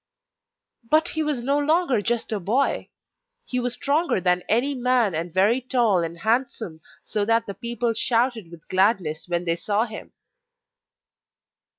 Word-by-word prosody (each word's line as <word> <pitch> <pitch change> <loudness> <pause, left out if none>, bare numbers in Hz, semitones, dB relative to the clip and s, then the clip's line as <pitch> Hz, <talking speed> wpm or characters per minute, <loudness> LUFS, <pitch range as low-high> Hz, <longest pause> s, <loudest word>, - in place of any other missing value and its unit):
But 310 +1 +4
he 315 - -2
was 295 -6 -1
no 280 +3 +1
longer 295 - +2
just 235 +2 -1
a 215 - -1
boy! 230 +10 0 0.6
He 250 - -2
was 245 -1 -1
stronger 295 - 0
than 180 0 +1
any 250 +6 +2
man 250 -5 +1
and 165 +2 -3
very 205 +8 +3
tall 240 -7 +2
and 165 +1 -5
handsome, 220 -7 -1 0.2
so 210 -1 -1
that 230 +2 +2
the 200 - -6
people 235 +1 -2
shouted 230 -4 +1
with 170 -2 -14
gladness 185 -5 +1
when 175 0 -2
they 165 -1 +1
saw 205 +6 0
him. 220 -2 -10
230 Hz, 155 wpm, -24 LUFS, 185-255 Hz, 0.6 s, But